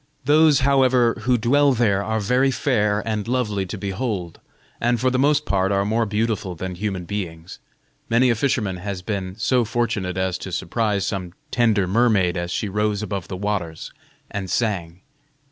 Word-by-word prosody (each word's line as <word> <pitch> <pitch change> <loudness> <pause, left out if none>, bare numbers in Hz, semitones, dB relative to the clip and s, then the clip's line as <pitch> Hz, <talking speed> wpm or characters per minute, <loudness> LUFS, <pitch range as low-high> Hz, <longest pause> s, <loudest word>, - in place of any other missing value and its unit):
Those, 150 0 +5
however, 130 -3 +3
who 125 0 +3
dwell 140 +5 +3
there 105 -5 +2
are 110 +1 -1
very 125 +6 +2
fair 105 -6 +1
and 110 -1 -2
lovely 105 -6 -1
to 105 - -5
behold, 100 -3 -4 0.4
and 120 0 +1
for 130 +2 +2
the 130 - 0
most 150 +2 +3
part 95 0 +1
are 100 0 +1
more 110 +2 +1
beautiful 105 -3 -1
than 95 +2 -5
human 95 -1 -3
beings. 85 -3 -6 0.5
Many 120 +2 +4
a - - +1
fisherman 110 -6 0
has 95 0 -5
been 95 -3 -4
so 120 +3 +2
fortunate 110 -6 -2
as 95 -1 -1
to 95 - -7
surprise 100 +3 -1
some 95 -4 -4 0.2
tender 110 -5 +2
mermaid 100 -3 +2
as 85 -1 -3
she 105 - -2
rose 105 +1 -1
above 100 -4 -4
the 95 - -5
waters 95 -5 -3 0.4
and 100 -2 -4
sang. 90 -5 -2
105 Hz, 170 wpm, -22 LUFS, 95-120 Hz, 0.5 s, Those